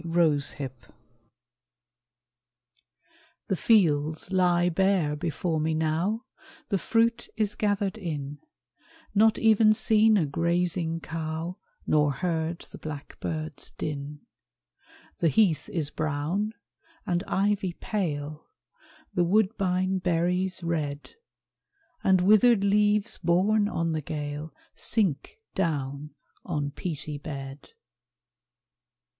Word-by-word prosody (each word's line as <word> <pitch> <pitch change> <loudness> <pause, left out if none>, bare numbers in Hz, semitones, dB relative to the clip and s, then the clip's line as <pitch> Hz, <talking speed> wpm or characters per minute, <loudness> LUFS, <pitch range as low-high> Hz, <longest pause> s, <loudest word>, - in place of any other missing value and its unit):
LATE 165 -4 +2
AUTUMN 135 -3 -3 2.8
The 190 - +2
fields 160 -6 +2
lie 175 -2 +3
bare 180 -4 +2
before 165 +1 -2
me 155 +1 0
now, 165 +9 0 0.4
The 200 -3 +1
fruit 230 +4 +1
is 210 -2 0
gathered 205 0 -1
in, 145 -6 -5 0.7
Not 220 +2 +4
even 220 -1 +5
seen 220 0 +4
a 170 - +2
grazing 165 +2 0
cow, 160 +3 -4 0.3
Nor 150 -2 +3
heard 165 +2 -2
the - - -10
blackbird's 155 0 -6
din. 145 0 -5 1.0
The 170 - +3
heath 175 -1 +2
is 150 -4 -2
brown, 160 +9 -2 0.5
and 175 0 0
ivy 195 -2 +1
pale, 155 -7 -3 0.7
The 175 - +2
woodbine 190 -1 +1
berries 180 +1 0
red, 150 -4 -3 0.9
And 190 -1 +4
withered 215 +2 +5
leaves 210 +2 +2
borne 195 +5 +3
on 165 -5 -1
the 155 -1 -1
gale 150 +1 -5 0.2
Sink 200 - -1 0.2
down 150 -4 -2 0.3
on 145 -5 -2
peaty 150 -2 -5
bed. 135 -1 -7
170 Hz, 100 wpm, -27 LUFS, 155-200 Hz, 2.8 s, even